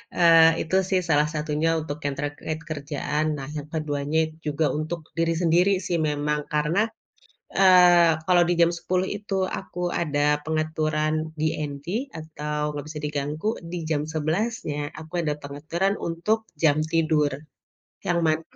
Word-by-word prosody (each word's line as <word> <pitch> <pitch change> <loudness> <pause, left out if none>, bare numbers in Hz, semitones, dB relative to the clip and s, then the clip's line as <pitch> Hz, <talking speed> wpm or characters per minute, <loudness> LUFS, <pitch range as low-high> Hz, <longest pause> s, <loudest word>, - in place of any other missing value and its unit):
Eee, 165 -1 +6
itu 185 - 0
sih 190 -1 +3
salah 150 0 +4
satunya 150 +1 0
untuk 150 -2 -5
yang 140 -1 -1
terkait 145 +2 -4
kerjaan, 150 0 -2
nah 135 - -6
yang 150 -1 -5
keduanya 150 -1 -1 0.3
juga 150 +1 0
untuk 160 +2 -3 0.2
diri 165 0 +1
sendiri 175 +3 +4 0.2
sih 175 - 0
memang, 150 +1 -1
karena, 150 +5 +1 0.8
eee, 180 -3 +7 0.2
kalau 175 -1 +5
di - - +4
jam 170 0 +5
10 185 +2 -1
itu 205 -1 -5 0.2
aku 180 -2 -8 0.2
ada 150 -2 +1
pengaturan 155 -1 0 0.3
DND 150 -2 -2 0.3
atau 150 -1 -3
gak 145 - -4
bisa 155 0 -6
diganggu, 150 +6 -2 0.2
di 180 - -3
jam 150 -2 +1
11-nya 160 +1 -1 0.2
aku 160 +2 -12
ada 150 -2 0
pengaturan 155 +7 -1
untuk 175 +7 0 0.2
jam 155 -2 +4
tidur. 155 -3 +2 0.8
Yang 175 -1 +2
mana 155 0 +2
155 Hz, 140 wpm, -25 LUFS, 150-170 Hz, 0.8 s, eee